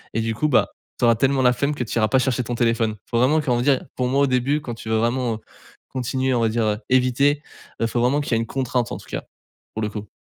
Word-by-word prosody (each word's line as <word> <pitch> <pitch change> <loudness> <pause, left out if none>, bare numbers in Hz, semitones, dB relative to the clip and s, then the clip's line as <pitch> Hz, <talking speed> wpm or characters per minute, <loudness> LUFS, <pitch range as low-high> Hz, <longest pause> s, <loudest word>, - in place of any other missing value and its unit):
et 115 - +1
du 115 0 -1
coup 150 - +1
bah, 110 -8 +3 0.3
tu 120 - +3
auras 115 - +6
tellement 135 +3 +2
la 125 - +5
flemme 140 +4 -1
que 125 - -2
tu 115 - -4
iras 110 - +3
pas 130 - +2
chercher 130 -1 0
ton 120 +1 -4
téléphone. 115 -2 +1 0.2
Faut 115 - +1
vraiment 140 +6 +4
comment 125 -5 0
dire? 135 0 +2
Pour 125 - 0
moi 135 +2 +2
au 140 - +4
début 130 +4 +1
quand 120 -5 -5
tu 110 - -9
veux 110 - +2
vraiment, 120 +1 0
heu, - - -9 0.5
continuer 130 +1 -1
on 120 - +1
va 115 - +2
dire, 115 0 0
heu, 105 -1 +1
éviter, 130 +3 +3 0.4
heu 115 - +2
faut 120 +1 -1
vraiment 130 +4 +2
qu'il 140 - -2
y - - +4
ait 115 - +1
une - - -2
contrainte 125 -2 -1
en - - -3
tout - - -14
cas, - - -4 0.5
pour 110 - -4
le 105 - -1
coup. 105 0 -7
125 Hz, 290 wpm, -22 LUFS, 115-130 Hz, 0.5 s, auras